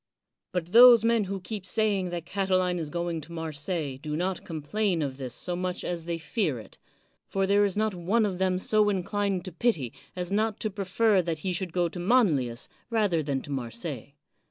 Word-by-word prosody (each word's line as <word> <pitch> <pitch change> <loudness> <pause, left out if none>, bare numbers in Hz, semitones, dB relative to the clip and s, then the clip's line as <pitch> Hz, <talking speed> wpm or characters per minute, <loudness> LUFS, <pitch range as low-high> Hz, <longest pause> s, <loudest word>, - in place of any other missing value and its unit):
But 175 -1 -3
those 235 0 +9
men 230 -2 +3
who 195 +1 -4
keep 195 +2 -6
saying 200 -1 0
that 175 -1 -5
Cati 190 +1 0
line 180 -1 0
is 155 -3 -4
going 170 0 -2
to 155 +3 -12
Marseilles 155 -3 -3
do 150 +1 -4
not 180 +3 -2
complain 170 +3 -1
of 135 -2 -4
this 130 -3 -5
so 180 +5 -1
much 180 0 -2
as 170 -2 -3
they 170 0 -2
fear 165 - -1
it; 110 -4 -12 0.5
for 195 0 0
there 200 +1 +4
is 200 -1 -2
not 215 -1 +1
one 190 +6 +1
of 185 -3 -3
them 185 -1 +2
so 210 +2 +3
inclined 200 0 -1
to 185 - -6
pity, 165 - 0 0.2
as 180 0 -4
not 215 +1 0
to 215 - -1
prefer 200 +1 +2
that 165 -2 -3
he 185 - 0
should 180 0 -2
go 175 0 +1
to 175 +2 -7
Manlius 170 - +2 0.2
rather 210 -8 +2
than 140 -3 -2
to 145 - -8
Marseilles. 130 +1 -5
180 Hz, 205 wpm, -27 LUFS, 160-205 Hz, 0.5 s, those